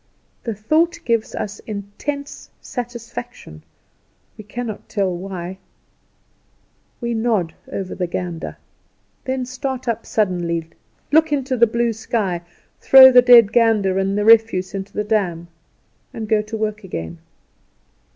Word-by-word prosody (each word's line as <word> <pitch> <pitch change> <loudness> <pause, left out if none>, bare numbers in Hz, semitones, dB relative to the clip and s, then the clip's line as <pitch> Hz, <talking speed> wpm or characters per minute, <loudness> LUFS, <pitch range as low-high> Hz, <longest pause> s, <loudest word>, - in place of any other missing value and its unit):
The 230 -3 -3
thought 315 - +1
gives 230 -2 0
us 205 -1 -5
intense 220 +8 -6
satisfaction, 240 - -8 0.7
we 215 - -11
cannot 220 +1 -6
tell 195 -3 -1
why. 185 0 -6 1.4
We 235 -1 -2
nod 220 -7 0 0.2
over 190 -2 -4
the 180 -1 -2
gander; 175 -1 -5 0.7
then 260 -1 -2
start 255 0 -5
up 230 - -2
suddenly, 175 -5 -1 0.4
look 320 +1 +4
into 270 -3 0
the 235 -1 +5
blue 235 +1 0
sky, 210 -5 -2 0.4
throw 265 -1 +9
the 250 0 +8
dead 240 -4 +7
gander 215 -5 +3
and 195 +1 0
the 210 - 0
refuse 220 -4 +4
into 195 0 -5
the 210 - -2
dam, 180 -6 -1 0.7
and 220 -2 -5
go 215 0 +2
to 215 +1 -6
work 215 0 -3
again. 80 - -6
215 Hz, 130 wpm, -20 LUFS, 190-240 Hz, 1.4 s, throw